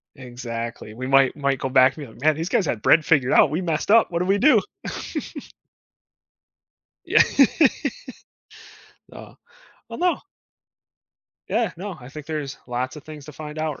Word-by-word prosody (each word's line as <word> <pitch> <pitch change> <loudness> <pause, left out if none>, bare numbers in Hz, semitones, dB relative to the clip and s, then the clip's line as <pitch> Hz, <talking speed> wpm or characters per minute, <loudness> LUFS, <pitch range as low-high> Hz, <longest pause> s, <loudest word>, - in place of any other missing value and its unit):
Exactly, 120 -4 -7
we 130 +3 -6
might 135 -1 +4
might 140 -2 -1
go 135 - -3
back 130 +1 +4
and 150 - -7
be, 110 - -15
like, 120 - -17
man, 155 -1 +3
these 165 +3 -4
guys 185 - +1
had 110 -6 -3
bread 160 - +5
figured 135 -5 +2
out. 145 - +5
We 165 +5 -2
messed 165 +2 -2
up. 225 -3 +5
What 170 - -1
do 180 - -1
we 195 +1 +3
do? 290 +8 +5 2.4
Yeah. - - +5 1.9
Uh, - - -12 0.6
oh, - - -7
no. 355 -3 0 1.3
Yeah, 225 -6 0
no, 190 +1 -6
I 125 0 -12
think 150 +1 -10
there's 150 -4 -5
lots 125 +3 -3
of 150 - -11
things 155 -2 -11
to 150 - -10
find 150 +2 -8
out, 155 -3 -3
150 Hz, 165 wpm, -23 LUFS, 130-165 Hz, 2.4 s, bread